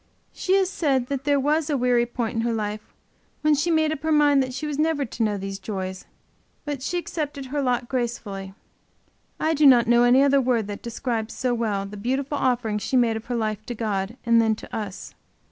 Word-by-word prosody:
She 380 - +1
has 385 -1 +3
said 275 -9 0
that 275 -1 -3
there 285 -1 +3
was 300 +3 +1
a 290 - +1
weary 245 -1 +2
point 240 -1 -3
in 225 - -1
her 235 0 0
life 210 -1 -3 0.6
when 305 0 +4
she 300 +4 +1
made 315 -2 +2
up 310 -3 -4
her 315 +1 -1
mind 290 -2 +5
that 260 -1 -2
she 275 +5 -5
was 295 -1 -3
never 310 -2 +1
to 230 - -7
know 210 -2 +1
these 195 0 -5
joys. 190 -2 -5 0.6
But 290 -3 -4
she 355 +6 -2
accepted 295 -5 -4
her 285 +2 -2
lot 250 -2 0
gracefully. 210 -7 -4 0.8
I 315 +1 +1
do 300 -1 +5
not 245 -3 +7
know 240 +1 +4
any 245 +3 +5
other 280 0 +4
word 240 -4 +1
that 205 - -6
describes 235 -1 -3
so 250 -1 0
well 215 -4 -1
the 205 +1 -9
beautiful 265 +6 -2
offering 240 -5 0
she 255 - 0
made 235 -2 +3
of 220 - -6
her 245 - -3
life 215 -2 -2
to 240 - -4
God 210 0 -2
and 230 -1 +5
then 220 -1 +2
to - - -9
us. 205 -3 -6
245 Hz, 220 wpm, -24 LUFS, 220-285 Hz, 0.8 s, not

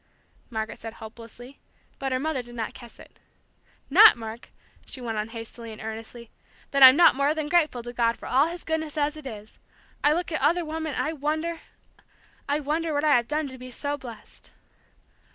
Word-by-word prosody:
Margaret 220 -2 -4
said 225 0 -7
hopelessly, 230 +4 -12 0.4
but 270 -1 -2
her 255 - +1
mother 295 0 -2
did 240 0 -12
not 225 -2 -4
catch 240 -2 -13
it. - - -16 0.7
"Not, 400 - +8
Mark," 225 0 -8 0.3
she - - -9
went 225 -3 -3
on 210 - -2
hastily 230 0 -8
and 215 - -10
earnestly, 225 +1 -8 0.4
"that 275 - +1
I'm 260 0 +11
not 340 +2 +7
more 280 +3 +1
than 310 -2 -2
grateful 305 -8 +2
to 240 +1 -7
God 235 -1 +1
for - - -11
all 275 +4 +3
His 340 +1 -6
goodness, 315 -1 -3
as 295 +1 0
it 305 -3 -9
is! 215 -3 -10 0.4
I 295 - +5
look 345 +2 -2
at 315 - -2
other 335 +5 +2
women, 315 -1 -4
and - - 0
I 310 - -2
wonder, 315 +3 -2 0.9
I 290 +1 +1
wonder 310 +2 -1
what 290 - 0
I 305 -1 +5
have 240 -1 +1
done 300 +1 -1
to 260 -1 -11
be 255 0 -9
so 285 +3 -3
blessed! 245 -6 -11
270 Hz, 200 wpm, -26 LUFS, 235-310 Hz, 0.9 s, I'm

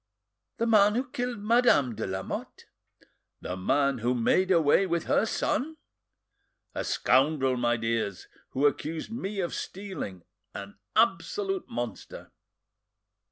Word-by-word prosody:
"The 230 - 0
man 210 -2 +5
who 255 +2 -1
killed 245 -1 -3
Madame 220 - +4
de - - -4
Lamotte?" 95 0 -5 0.8
"The 90 - -4
man 135 +8 +1
who 120 +3 0
made 180 +10 +2
away 170 +2 +4
with 170 -2 0
her 220 - +2
son?" 310 +7 -1 1.0
"A - - -3
scoundrel, 135 -2 +2
my 120 -1 +1
dears, 115 -4 -2 0.2
who 135 +3 0
accused 155 +6 -1
me 210 -3 -4
of 175 - -3
stealing, 185 - -6 0.3
an 100 0 -8 0.2
absolute 385 - +1
monster!" 120 -3 -6
155 Hz, 120 wpm, -28 LUFS, -, 1.0 s, man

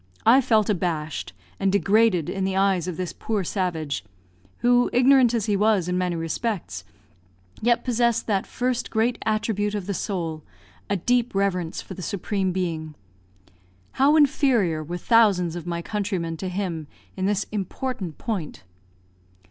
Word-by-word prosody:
I 250 +4 +7
felt 220 -5 +3
abashed, 165 -6 -2 0.3
and 195 - +2
degraded 200 -4 +3
in 195 - -2
the 190 0 -1
eyes 190 -3 +2
of 175 -3 -4
this 180 -2 -3
poor 215 -3 -2
savage 165 -6 -2 0.6
who, 245 0 +4
ignorant 255 -1 +5
as 220 -3 0
he 210 - +1
was 205 -3 +2
in 180 - -1
many 180 -1 0
respects, 165 - -3 0.8
yet 235 +1 +2
possessed 235 -1 +1
that 200 -3 0
first 250 -1 -2
great 230 +2 0
attribute 215 -1 0
of 200 -3 -3
the 200 - -2
soul, 170 -6 -3 0.5
a 200 - +1
deep 240 +4 +1
reverence 185 -4 -1
for - - -9
the 185 - -8
Supreme 195 +1 -2
Being. 165 -4 -3 1.0
How 280 +3 +4
inferior 255 - +3
were 175 +3 -5
thousands 190 -5 +3
of 175 -1 -7
my 170 0 -3
countrymen 190 -6 -2
to 185 +3 -4
him 180 -5 -3 0.3
in 190 0 -1
this 205 0 0
important 200 - -4
point. 190 - -4
195 Hz, 150 wpm, -24 LUFS, 175-225 Hz, 1.0 s, I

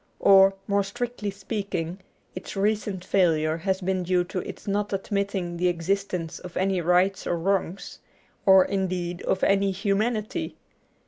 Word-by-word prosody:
Or, 195 0 +6
more 200 0 +1
strictly 215 +1 -4
speaking, 195 -3 -4 0.3
its 185 - -7
recent 205 -2 -1
failure 160 -4 +2
has 190 +3 -1
been 185 0 0
due 180 0 +1
to 185 +1 -4
its 195 - -8
not 205 +1 -1
admitting 195 -3 -2
the 180 +1 +1
existence 175 -1 -2
of 180 -1 -9
any 190 -1 +1
rights 180 +3 +2
or 175 - 0
wrongs, 195 +1 -2 0.4
or 190 -1 +7
indeed 185 -2 -2
of 190 - -1
any 195 0 +3
humanity. 210 +3 -1
190 Hz, 140 wpm, -25 LUFS, 180-200 Hz, 0.4 s, or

